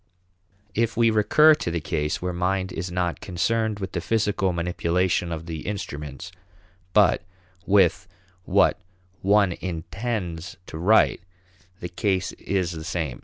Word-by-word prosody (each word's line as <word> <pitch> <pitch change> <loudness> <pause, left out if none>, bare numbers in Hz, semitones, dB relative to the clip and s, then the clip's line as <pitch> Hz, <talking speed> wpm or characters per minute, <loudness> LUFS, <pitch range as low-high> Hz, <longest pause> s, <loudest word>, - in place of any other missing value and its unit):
If 115 +2 0
we 115 -1 +4
recur 150 +9 +6
to 150 - -2
the 85 0 -1
case 75 +1 -2
where 90 -1 -1
mind 95 +1 -1
is 85 +1 -4
not 90 -1 -1
concerned 110 +4 0
with 95 -2 -5
the 85 - -3
physical 105 -2 +1
manipulation 90 0 0
of 80 0 -5
the 80 -2 -5
instruments 85 -4 -5 0.6
but 105 -4 +4 0.5
with 95 -4 +3 0.4
what 100 +2 +3 0.4
one 100 -1 +4
intends 90 +1 -4
to 80 - -8
write, 105 +3 +4 0.6
the 90 - -3
case 95 0 -1
is 95 -3 -2
the 80 -2 -6
same. 80 -6 -3
90 Hz, 135 wpm, -24 LUFS, 85-100 Hz, 0.6 s, recur